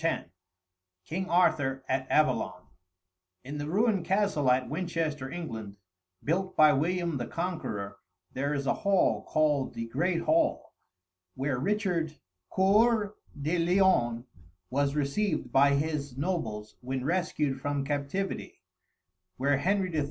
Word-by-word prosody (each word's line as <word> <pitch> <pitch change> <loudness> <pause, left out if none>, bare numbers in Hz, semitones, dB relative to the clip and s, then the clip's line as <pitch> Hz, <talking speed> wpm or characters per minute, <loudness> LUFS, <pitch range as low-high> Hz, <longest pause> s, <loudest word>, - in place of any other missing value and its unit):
X 165 - -1 0.7
KING 185 +3 -3
ARTHUR 135 -6 +2
AT 130 0 -1
AVALON 155 0 +1 0.8
In 145 +3 -6
the 145 - -3
ruined 205 0 +2
castle 190 -7 +1
at 125 0 +3
Winchester, 155 -4 -2
England, 110 -11 -6 0.5
built 185 +5 -1
by 155 -1 +7
William 170 +2 0
the 120 - -4
Conqueror, 135 - -4 0.3
there 140 +3 -1
is 140 -1 -2
a - - +2
hall 200 -2 +2
called 150 -3 +1
"The 115 - -3
Great 165 +9 0
Hall," 320 - +1 0.6
where 135 -1 -1
Richard 180 -3 0 0.3
Coeur 210 +2 +3 0.3
de 155 +5 0
Lion 165 -10 +3 0.5
was 140 +1 +1
received 155 +6 -1
by 140 +1 +5
his 145 -3 -2
nobles 110 -10 -3
when 130 +1 -3
rescued 150 -5 0
from 145 -1 -1
captivity; 145 +7 -3 0.7
where 140 +2 +2
Henry 185 +3 0
III. 155 - +1
150 Hz, 125 wpm, -29 LUFS, 135-185 Hz, 0.8 s, by